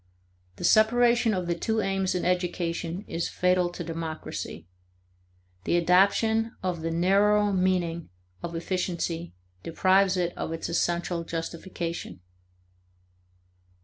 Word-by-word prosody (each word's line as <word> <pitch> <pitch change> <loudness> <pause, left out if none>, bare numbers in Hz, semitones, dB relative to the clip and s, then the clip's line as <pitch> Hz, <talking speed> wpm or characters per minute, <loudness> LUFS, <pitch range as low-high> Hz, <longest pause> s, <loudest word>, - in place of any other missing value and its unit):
The - - -9
separation 235 +1 +4
of 180 -1 -2
the 170 - 0
two 220 +6 -1
aims 195 -2 0
in 180 - -1
education 175 0 -1
is 165 +1 -2
fatal 180 -1 +2
to 175 - -6
democracy; 160 - -5 1.0
the 170 - +1
adoption 200 +6 +3
of 180 -3 -2
the 165 - -2
narrower 200 +4 +3
meaning 180 - 0 0.3
of 170 - -5
efficiency 170 - -3 0.3
deprives 185 - +3
it 175 -1 -1
of 160 - -4
its 165 - -4
essential 170 0 0
justification. 165 - -5
180 Hz, 115 wpm, -27 LUFS, 170-195 Hz, 1.0 s, separation